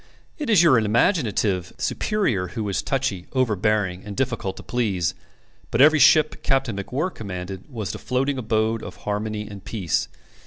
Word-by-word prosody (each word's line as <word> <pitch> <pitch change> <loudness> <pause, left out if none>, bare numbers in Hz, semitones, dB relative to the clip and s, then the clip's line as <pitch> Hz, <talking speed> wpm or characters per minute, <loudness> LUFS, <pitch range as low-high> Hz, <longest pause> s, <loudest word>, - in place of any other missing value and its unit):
It 295 -5 -3
is 200 -6 +6
your 140 -8 +6
imaginative 110 - +1
superior 130 - 0
who 110 -2 -1
is 100 - 0
touchy, 130 -10 -2
overbearing, 105 -6 +1
and 105 -1 -8
difficult 115 -7 -2
to - - -9
please; 95 -8 -1 0.6
but 115 - -1
every 155 +3 +7
ship 150 +2 +5
Captain 135 -5 +1
MacWhirr 135 - -2
commanded 95 -2 -7
was 110 -8 -4
the - - -7
floating 135 +2 -1
abode 110 -1 0
of - - -8
harmony 105 0 -2
and 100 -2 -10
peace. 95 -8 -1
110 Hz, 155 wpm, -23 LUFS, 100-135 Hz, 0.6 s, every